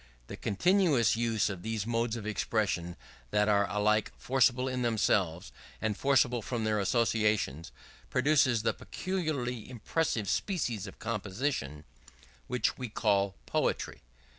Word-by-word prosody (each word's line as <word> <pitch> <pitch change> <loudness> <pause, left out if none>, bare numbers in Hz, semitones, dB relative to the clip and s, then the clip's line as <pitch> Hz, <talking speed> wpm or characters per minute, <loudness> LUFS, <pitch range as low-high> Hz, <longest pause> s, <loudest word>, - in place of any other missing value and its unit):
The - - -7
continuous 165 - +2
use 115 -2 +1
of 95 -4 -5
these 110 0 -3
modes 115 0 0
of 110 -3 -6
expression 100 -5 -1 0.3
that 105 +9 +2
are 100 -1 +3
alike 105 +1 +1
forcible 130 0 +2
in 130 -1 -2
themselves 95 -6 +1 0.3
and 110 -1 -1
forcible 125 -2 +2
from 115 0 -3
their 110 -1 +1
associations, 105 - +1 0.4
produces 130 -4 +3
the - - +2
peculiarly 145 - -3
impressive 120 -2 -1
species 120 - -1
of 95 - -10
composition 105 - -3 0.6
which 125 - 0
we 125 -2 -4
call 100 -2 +1
poetry. - - -1
110 Hz, 125 wpm, -30 LUFS, 100-125 Hz, 0.6 s, are